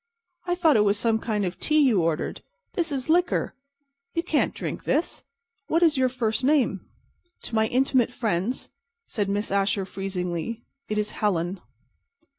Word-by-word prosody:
"I 355 - +1
thought 325 -7 +4
it 210 - +5
was 205 0 +2
some 225 +1 +1
kind 210 -3 -1
of 180 0 -4
tea 310 - +2
you 255 - +5
ordered. 165 -1 -1 0.3
This 335 -3 -1
is 265 -3 -2
liquor. 345 +2 +2 0.6
You 335 - +1
can't 320 -4 +1
drink - - -5
this. 325 - 0 0.4
What 330 +2 +2
is 320 -3 +5
your 260 -1 +3
first 235 -2 -1
name?" 260 -8 +2 0.6
"To - - -8
my 220 0 +3
intimate 255 -1 +2
friends," 225 0 -1 0.4
said 205 -4 -2
Miss 205 +1 -1
Asher, 195 0 +1
freezingly, 190 +3 -4 0.2
"it 215 - -1
is 210 0 -1
'Helen. 180 -2 -1
220 Hz, 160 wpm, -25 LUFS, 195-275 Hz, 0.6 s, it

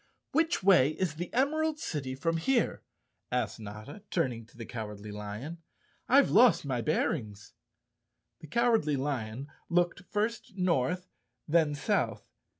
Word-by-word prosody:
"Which 325 - +1
way 180 -8 +6
is 180 -2 -1
the 175 +1 -4
Emerald 310 +4 +1
City 135 - -4
from 165 +5 0
here?" 235 +8 +1 0.5
asked 120 -3 -1
Notta, 105 - -9
turning 125 -9 -1
to 115 - -21
the 115 - -6
Cowardly 105 -2 -6
Lion. 105 +11 -6 0.5
"I've 275 +2 +5
lost 230 -6 +6
my 130 -4 -1
bearings." 110 -8 -1 0.9
The 155 - -11
Cowardly 225 - +2
Lion 130 -2 -3 0.2
looked 175 +2 +1
first 215 0 -2
north, 180 0 +1 0.4
then 155 -2 +3
south. 145 - -1
155 Hz, 130 wpm, -30 LUFS, 120-200 Hz, 0.9 s, way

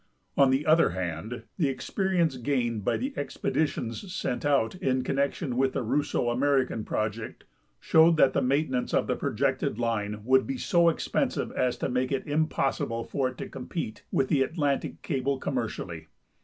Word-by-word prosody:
On 140 -2 +5
the 135 +3 +1
other 160 +2 +5
hand, 95 +7 -4 0.2
the 150 -5 +3
experience 175 +2 0
gained 120 -4 -1
by - - +1
the 270 +3 -3
expedi 155 - -1
tions 125 - -6
sent 125 -8 -2
out 140 -6 +2
in 130 -7 0
connection 140 0 -1
with 135 0 +2
the - - -1
Russo 120 0 0
American 130 -2 +1
project 110 +1 -3 0.4
showed 160 - +5
that 135 -3 +5
tlie - - +1
maintenance 130 -1 0
of - - +2
the - - 0
projected - - -1
line 105 -3 -1
would 130 - +3
he 270 - -1
so 170 -8 +3
expensive 165 - -1
as 125 -1 0
to - - -1
make 130 +1 -1
it 135 - -1
iin 155 +2 +1
possible 115 -4 -1
for 130 +1 -1
it 130 - -12
to - - -5
compete 125 -4 -5
with 135 - +2
the 140 - +3
Atlantic 145 -1 -1
cable, 135 +1 -1
commercially. - - -4
135 Hz, 170 wpm, -28 LUFS, 120-150 Hz, 0.4 s, On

